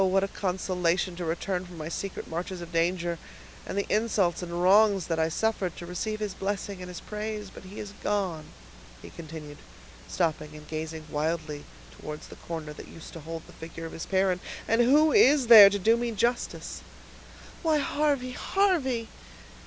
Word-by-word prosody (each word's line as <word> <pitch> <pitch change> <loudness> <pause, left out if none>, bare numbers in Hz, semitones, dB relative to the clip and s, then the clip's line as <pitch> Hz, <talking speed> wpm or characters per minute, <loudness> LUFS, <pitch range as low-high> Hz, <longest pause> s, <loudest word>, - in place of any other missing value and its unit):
what 190 +1 +3
a - - +1
consolation 180 -2 -1
to 175 - -5
return 180 +3 -2
from 180 -2 -11
my 155 -1 -5
secret 190 +3 -5
marches 175 +3 -4
of 170 0 -8
danger, 170 0 0 0.5
and - - -4
the 200 - +1
insults 210 -6 +1
and 175 0 -3
wrongs 200 0 +5
that 165 -1 -1
I 160 0 +2
suffered, 190 -1 -1
to 175 - -7
receive 215 +5 -3
his 210 -2 -3
blessing 195 -1 -3
and 180 - -6
his 180 -1 -7
praise; 210 -1 -5
but - - -12
he 195 +3 -9
is 205 - -6
gone," 185 -7 -1 0.6
he - - -10
continued, 155 -3 -9 0.5
stopping 155 -3 -1
and 150 0 -11
gazing 160 0 -5
wildly 155 -1 -2 0.3
towards 150 - -8
the - - -10
corner 160 -3 -6
that - - -10
used 165 - -11
to 165 - -7
hold 160 +1 -7
the - - -15
figure 165 0 -8
of 165 - -6
his 165 - -6
parent, 190 -2 +2 0.3
"and 225 +2 +4
who 295 +6 +5
is 290 - +6
there 220 -4 +11
to 205 - -1
do 220 +4 +4
me 240 0 -1
justice?" 235 +3 -1 0.8
"Why, 320 -3 +3
Harvey! 285 -3 0
Harvey!" 265 - +1
185 Hz, 180 wpm, -28 LUFS, 165-215 Hz, 0.8 s, there